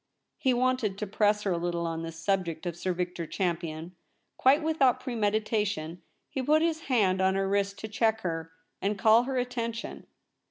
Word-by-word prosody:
He 260 Hz, -, +2 dB
wanted 245 Hz, -5 st, +1 dB
to 210 Hz, -, -3 dB
press 210 Hz, +1 st, +2 dB
her 195 Hz, -, 0 dB
a 170 Hz, -, 0 dB
little 170 Hz, 0 st, -2 dB
on 165 Hz, -1 st, -3 dB
this 165 Hz, 0 st, -6 dB
subject 170 Hz, -2 st, -1 dB
of 175 Hz, -2 st, -3 dB
Sir 185 Hz, +2 st, -2 dB
Victor 175 Hz, -1 st, -3 dB
Champion; 170 Hz, -2 st, -3 dB, 0.4 s
quite 280 Hz, +4 st, +4 dB
with 315 Hz, -1 st, -1 dB
out 255 Hz, -2 st, +5 dB
premeditation 210 Hz, -, -1 dB, 0.3 s
he 265 Hz, -, -3 dB
put 305 Hz, +4 st, +3 dB
his 325 Hz, -1 st, -1 dB
hand 195 Hz, -7 st, +3 dB
on 190 Hz, 0 st, +3 dB
her 195 Hz, 0 st, +1 dB
wrist 200 Hz, 0 st, 0 dB
to 220 Hz, -, -4 dB
check 220 Hz, +1 st, +1 dB
her, 165 Hz, -2 st, -3 dB, 0.3 s
and 205 Hz, +1 st, 0 dB
call 225 Hz, +4 st, +5 dB
her 265 Hz, 0 st, -2 dB
attention. 235 Hz, -2 st, -3 dB
205 Hz, 185 wpm, -28 LUFS, 175-240 Hz, 0.4 s, out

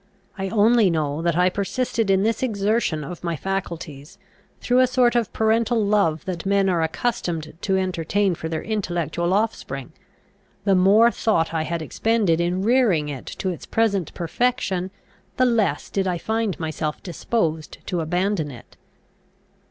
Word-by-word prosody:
I 195 Hz, -2 st, -3 dB
only 220 Hz, 0 st, +4 dB
know 155 Hz, -2 st, -1 dB
that 170 Hz, -1 st, 0 dB
I 180 Hz, +1 st, +3 dB
persisted 225 Hz, +2 st, -1 dB
in 195 Hz, 0 st, +3 dB
this 225 Hz, 0 st, 0 dB
exertion 210 Hz, -8 st, 0 dB
of 175 Hz, +4 st, -8 dB
my 170 Hz, -1 st, -1 dB
faculties, 165 Hz, -5 st, -5 dB, 0.4 s
through 250 Hz, +1 st, +2 dB
a 255 Hz, -, +5 dB
sort 250 Hz, -1 st, +2 dB
of 235 Hz, -3 st, +1 dB
parental 225 Hz, +1 st, +2 dB
love 200 Hz, -7 st, +1 dB
that 180 Hz, -3 st, -4 dB
men 195 Hz, 0 st, +2 dB
are 175 Hz, -3 st, +1 dB
accustomed 160 Hz, -2 st, -2 dB
to 190 Hz, -1 st, +1 dB
entertain 185 Hz, +1 st, 0 dB
for 160 Hz, -1 st, -5 dB
their 160 Hz, -1 st, -3 dB
intellectual 175 Hz, -5 st, -2 dB
offspring; 190 Hz, -, -2 dB, 0.7 s
the 200 Hz, -1 st, +3 dB
more 200 Hz, +6 st, +5 dB
thought 165 Hz, -10 st, 0 dB
I 160 Hz, -, 0 dB
had 165 Hz, +1 st, -3 dB
expended 205 Hz, -3 st, +1 dB
in 180 Hz, +2 st, 0 dB
rearing 215 Hz, -, +3 dB
it 135 Hz, -3 st, -7 dB
to 190 Hz, -, -3 dB
its 175 Hz, -, -6 dB
present 200 Hz, -6 st, +1 dB
perfection, 190 Hz, 0 st, -1 dB, 0.5 s
the 255 Hz, -, +4 dB
less 230 Hz, -4 st, +1 dB
did 195 Hz, -1 st, 0 dB
I 180 Hz, -1 st, 0 dB
find 220 Hz, +2 st, -2 dB
myself 155 Hz, -1 st, -3 dB
disposed 165 Hz, -3 st, -2 dB
to 175 Hz, -2 st, -2 dB
abandon 175 Hz, 0 st, 0 dB
it. 125 Hz, -4 st, -13 dB
190 Hz, 155 wpm, -23 LUFS, 165-220 Hz, 0.7 s, a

